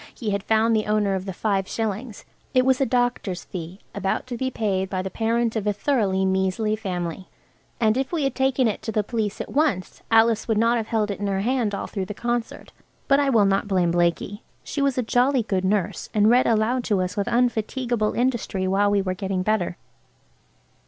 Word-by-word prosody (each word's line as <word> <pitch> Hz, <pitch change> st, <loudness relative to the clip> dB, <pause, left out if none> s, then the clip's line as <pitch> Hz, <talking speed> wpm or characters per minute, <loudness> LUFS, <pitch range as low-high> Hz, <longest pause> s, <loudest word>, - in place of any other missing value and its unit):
He 220 Hz, -4 st, -3 dB
had 200 Hz, 0 st, -1 dB
found 225 Hz, +2 st, +2 dB
the 215 Hz, -1 st, 0 dB
owner 210 Hz, -2 st, +1 dB
of 190 Hz, 0 st, -3 dB
the 195 Hz, -, -4 dB
five 195 Hz, 0 st, -1 dB
shillings. 220 Hz, +1 st, -4 dB, 0.3 s
It 255 Hz, 0 st, +4 dB
was 265 Hz, 0 st, +3 dB
a 270 Hz, -, +3 dB
doctor's 245 Hz, -7 st, 0 dB
fee, 180 Hz, +1 st, -7 dB
about 190 Hz, -, -2 dB
to 250 Hz, -1 st, -5 dB
be 260 Hz, +2 st, -1 dB
paid 195 Hz, -6 st, -1 dB
by 185 Hz, -1 st, -2 dB
the 190 Hz, -, -5 dB
parent 230 Hz, 0 st, 0 dB
of 210 Hz, -2 st, -2 dB
a 205 Hz, -, +2 dB
thoroughly 200 Hz, -5 st, +1 dB
measly 190 Hz, +3 st, +1 dB
family. 185 Hz, -4 st, -4 dB, 0.5 s
And 220 Hz, -2 st, +3 dB
if 265 Hz, +1 st, -1 dB
we 330 Hz, -4 st, 0 dB
had 270 Hz, -2 st, 0 dB
taken 265 Hz, -1 st, +2 dB
it 210 Hz, -, -2 dB
to 220 Hz, -, -4 dB
the 215 Hz, -1 st, 0 dB
police 215 Hz, -2 st, -2 dB
at -, -, -5 dB
once 275 Hz, -, 0 dB
Alice 225 Hz, 0 st, +4 dB
would 225 Hz, -2 st, +1 dB
not 230 Hz, +2 st, +3 dB
have 220 Hz, -2 st, -3 dB
held 215 Hz, -2 st, 0 dB
it 200 Hz, -, -5 dB
in 205 Hz, -, -2 dB
her 195 Hz, -1 st, 0 dB
hand 235 Hz, -2 st, 0 dB
all -, -, -4 dB
through 195 Hz, -3 st, -4 dB
the 210 Hz, -, -7 dB
concert–but 240 Hz, +4 st, -2 dB
I 285 Hz, -1 st, +2 dB
will 225 Hz, -6 st, +4 dB
not 195 Hz, +1 st, +1 dB
blame 180 Hz, -4 st, +2 dB
Blakie. 175 Hz, +4 st, 0 dB, 0.2 s
She 285 Hz, -, -3 dB
was 275 Hz, -2 st, +1 dB
a 250 Hz, -, +1 dB
jolly 250 Hz, +2 st, +2 dB
good 190 Hz, -3 st, -1 dB
nurse, 195 Hz, -1 st, -1 dB
and 210 Hz, +1 st, +5 dB
read 250 Hz, +1 st, +4 dB
aloud 230 Hz, +3 st, +2 dB
to 205 Hz, -4 st, +1 dB
us 185 Hz, +1 st, -2 dB
with 200 Hz, -, -1 dB
unfatiguable 240 Hz, -1 st, 0 dB
industry 235 Hz, -6 st, -1 dB
while 200 Hz, +2 st, +2 dB
we 200 Hz, -1 st, +2 dB
were 185 Hz, -1 st, -1 dB
getting 190 Hz, -1 st, -2 dB
better. 190 Hz, -4 st, 0 dB
215 Hz, 215 wpm, -24 LUFS, 195-240 Hz, 0.5 s, and